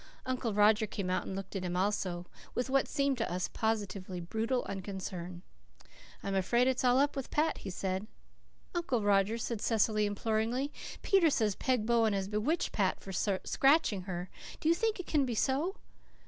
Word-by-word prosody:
Uncle 255 Hz, -3 st, -1 dB
Roger 210 Hz, +1 st, +4 dB
came 195 Hz, -3 st, -3 dB
out 185 Hz, -, -1 dB
and 190 Hz, -, -4 dB
looked 195 Hz, +1 st, -6 dB
at 190 Hz, -, -2 dB
him 180 Hz, 0 st, -2 dB
also, 185 Hz, -2 st, -1 dB, 0.3 s
with 250 Hz, +1 st, -1 dB
what 275 Hz, 0 st, +3 dB
seemed 275 Hz, -2 st, 0 dB
to 225 Hz, -, -1 dB
us 180 Hz, 0 st, -1 dB
positively 200 Hz, -4 st, -2 dB
brutal 225 Hz, +8 st, -1 dB
unconcern. 185 Hz, -2 st, -5 dB, 0.8 s
"I'm 195 Hz, -, -2 dB
afraid 235 Hz, +7 st, +3 dB
it's 260 Hz, 0 st, +1 dB
all 250 Hz, 0 st, +5 dB
up 285 Hz, +2 st, +2 dB
with 270 Hz, -2 st, -4 dB
Pat," 315 Hz, +2 st, +1 dB
he 195 Hz, -, -6 dB
said. 190 Hz, +2 st, -3 dB, 0.7 s
"Uncle 330 Hz, -, 0 dB
Roger," 205 Hz, +2 st, +3 dB
said 230 Hz, -2 st, -3 dB
Cecily 215 Hz, -2 st, +2 dB
imploringly, 225 Hz, +6 st, -1 dB, 0.3 s
"Peter 380 Hz, -5 st, +5 dB
says 220 Hz, -7 st, +1 dB
Peg 250 Hz, 0 st, 0 dB
Bowen 225 Hz, -2 st, +3 dB
has 195 Hz, -1 st, -1 dB
bewitched 215 Hz, -, 0 dB
Pat 195 Hz, -3 st, +1 dB
for 195 Hz, -, -8 dB, 0.3 s
scratching 270 Hz, -, +3 dB
her. 180 Hz, -1 st, -5 dB, 0.3 s
Do 315 Hz, -, +1 dB
you -, -, +7 dB
think 435 Hz, +3 st, 0 dB
it 370 Hz, -, -5 dB
can 295 Hz, -3 st, +2 dB
be 245 Hz, -3 st, -2 dB
so?" 285 Hz, -, +1 dB
220 Hz, 175 wpm, -32 LUFS, 195-260 Hz, 0.8 s, you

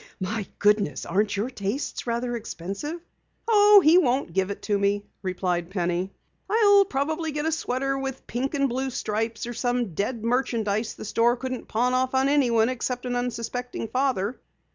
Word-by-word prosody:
My 205 Hz, +2 st, -3 dB
goodness, 205 Hz, -9 st, +2 dB
aren't 205 Hz, +1 st, 0 dB
your 225 Hz, +6 st, -1 dB
tastes 240 Hz, +4 st, -4 dB
rather 240 Hz, +1 st, -1 dB
expensive?" 220 Hz, -, -5 dB, 0.5 s
"Oh, 415 Hz, -2 st, +7 dB
he 330 Hz, +4 st, +7 dB
won't 260 Hz, -, 0 dB
give 190 Hz, +1 st, +1 dB
it 200 Hz, -, -6 dB
to 205 Hz, -2 st, 0 dB
me," 200 Hz, +1 st, +1 dB, 0.2 s
replied 180 Hz, -2 st, -2 dB
Penny. 180 Hz, 0 st, -1 dB, 0.4 s
"I'll 405 Hz, -2 st, +5 dB
probably 315 Hz, +2 st, -2 dB
get 300 Hz, +1 st, -3 dB
a 320 Hz, -, +1 dB
sweater 275 Hz, -3 st, -1 dB
with 270 Hz, -1 st, -5 dB
pink 265 Hz, +5 st, -2 dB
and 275 Hz, -1 st, +2 dB
blue 265 Hz, +2 st, -2 dB
stripes 225 Hz, -1 st, -2 dB
or 240 Hz, -, -5 dB
some 245 Hz, -4 st, -1 dB
dead 215 Hz, +6 st, -2 dB
merchandise 230 Hz, -3 st, 0 dB
the -, -, -8 dB
store 235 Hz, +3 st, +2 dB
couldn't 255 Hz, 0 st, -5 dB
pawn 245 Hz, +3 st, +1 dB
off 255 Hz, +1 st, +1 dB
on 265 Hz, +1 st, +3 dB
anyone 240 Hz, -6 st, +3 dB
except 250 Hz, 0 st, -3 dB
an 245 Hz, 0 st, -2 dB
unsuspecting 245 Hz, -1 st, -3 dB
father." 250 Hz, -3 st, 0 dB
245 Hz, 165 wpm, -25 LUFS, 205-270 Hz, 0.5 s, Oh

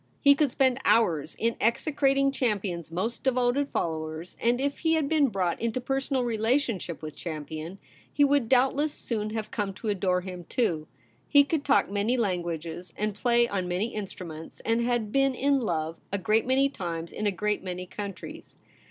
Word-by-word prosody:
He 280 Hz, -1 st, +7 dB
could 285 Hz, 0 st, +2 dB
spend 260 Hz, 0 st, +2 dB
hours 165 Hz, -10 st, +2 dB
in 230 Hz, +1 st, 0 dB
execrating 275 Hz, +3 st, +2 dB
Champion's 200 Hz, -, -1 dB
most 190 Hz, +8 st, -3 dB
devoted 255 Hz, +2 st, +2 dB
followers, 160 Hz, +1 st, -3 dB
and 240 Hz, +2 st, +2 dB
if 280 Hz, +1 st, -1 dB
he 325 Hz, -1 st, +2 dB
had 310 Hz, -3 st, +1 dB
been 305 Hz, -2 st, +3 dB
brought 190 Hz, -6 st, -1 dB
into 230 Hz, +2 st, 0 dB
personal 270 Hz, +1 st, -1 dB
relationship 225 Hz, -, 0 dB
with 155 Hz, -1 st, -6 dB
Champion 160 Hz, +2 st, -6 dB, 0.3 s
he 290 Hz, -, +3 dB
would 280 Hz, -5 st, +3 dB
doubtless 270 Hz, +4 st, +3 dB
soon 215 Hz, -6 st, -3 dB
have 215 Hz, -1 st, -4 dB
come 200 Hz, -3 st, -2 dB
to 220 Hz, -, -4 dB
adore 185 Hz, -2 st, +1 dB
him 180 Hz, -2 st, -7 dB
too. 165 Hz, -11 st, 0 dB, 0.4 s
He 285 Hz, -1 st, +7 dB
could 290 Hz, 0 st, -1 dB
talk 280 Hz, -8 st, +3 dB
many 205 Hz, +5 st, +1 dB
languages 175 Hz, -4 st, -2 dB
and 210 Hz, 0 st, -1 dB
play 235 Hz, +3 st, +3 dB
on 190 Hz, -5 st, -2 dB
many 185 Hz, +6 st, -1 dB
instruments, 175 Hz, -6 st, -7 dB
and 230 Hz, +1 st, +1 dB
he 235 Hz, -, 0 dB
had 235 Hz, -4 st, 0 dB
been 270 Hz, 0 st, +2 dB
in 275 Hz, +2 st, +2 dB
love 165 Hz, -8 st, -2 dB
a 200 Hz, -, 0 dB
great 215 Hz, +4 st, +1 dB
many 265 Hz, +2 st, +4 dB
times 170 Hz, -9 st, -5 dB
in 210 Hz, -, -2 dB
a -, -, +3 dB
great 210 Hz, +2 st, -1 dB
many 180 Hz, -1 st, -4 dB
countries. 195 Hz, +1 st, -8 dB
220 Hz, 180 wpm, -27 LUFS, 180-260 Hz, 0.4 s, He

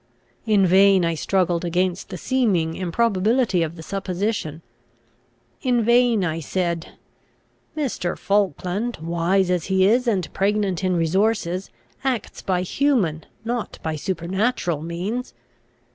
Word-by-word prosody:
In 205 Hz, -3 st, +4 dB
vain 190 Hz, 0 st, +5 dB
I 165 Hz, -, +1 dB
struggled 175 Hz, +1 st, 0 dB
against 180 Hz, +1 st, -1 dB
the 185 Hz, -, -6 dB
seeming 190 Hz, -8 st, +1 dB
improbability 200 Hz, +3 st, +1 dB
of 165 Hz, 0 st, -2 dB
the 160 Hz, -, -9 dB
supposition. 190 Hz, -4 st, -3 dB, 1.0 s
In 245 Hz, -4 st, +2 dB
vain 235 Hz, -2 st, +4 dB
I 165 Hz, -1 st, -2 dB
said, 170 Hz, +1 st, -2 dB, 0.8 s
"Mr. 245 Hz, -, -2 dB
Falkland, 200 Hz, -, 0 dB
wise 170 Hz, +3 st, +1 dB
as 180 Hz, -3 st, 0 dB
he 190 Hz, -1 st, +3 dB
is, 240 Hz, +5 st, +3 dB
and 195 Hz, -6 st, 0 dB
pregnant 195 Hz, -2 st, 0 dB
in 185 Hz, -1 st, +1 dB
resources, 185 Hz, +2 st, 0 dB, 0.3 s
acts 255 Hz, -5 st, -2 dB
by 180 Hz, -1 st, 0 dB
human, 190 Hz, -, 0 dB, 0.2 s
not 235 Hz, -1 st, -3 dB
by 160 Hz, -1 st, -2 dB
supernatural 180 Hz, -, -1 dB
means. 180 Hz, -, -4 dB
190 Hz, 120 wpm, -22 LUFS, 170-215 Hz, 1.0 s, vain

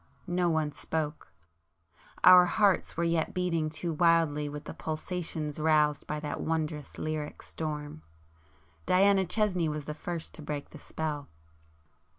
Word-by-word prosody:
No 175 Hz, -1 st, +1 dB
one 160 Hz, -2 st, +1 dB
spoke,—our 140 Hz, -, +1 dB
hearts 200 Hz, -2 st, +2 dB
were 170 Hz, -, +1 dB
yet 165 Hz, -1 st, 0 dB
beating 165 Hz, -4 st, 0 dB
too 160 Hz, +2 st, -3 dB
wildly 160 Hz, -3 st, +3 dB
with 145 Hz, 0 st, -7 dB
the -, -, -7 dB
pulsations 160 Hz, -1 st, -4 dB
roused 150 Hz, -2 st, +2 dB
by 150 Hz, -, -2 dB
that 150 Hz, -1 st, -4 dB
wondrous 155 Hz, -2 st, -3 dB
lyric 155 Hz, -1 st, -4 dB
storm. 150 Hz, -1 st, -5 dB, 0.9 s
Diana 190 Hz, +1 st, +4 dB
Chesney 185 Hz, -4 st, +1 dB
was 150 Hz, -1 st, -4 dB
the 150 Hz, -, -4 dB
first 165 Hz, +1 st, -5 dB
to -, -, -8 dB
break 145 Hz, -1 st, -5 dB
the -, -, -11 dB
spell. 150 Hz, -2 st, -4 dB
155 Hz, 135 wpm, -29 LUFS, 150-170 Hz, 0.9 s, Diana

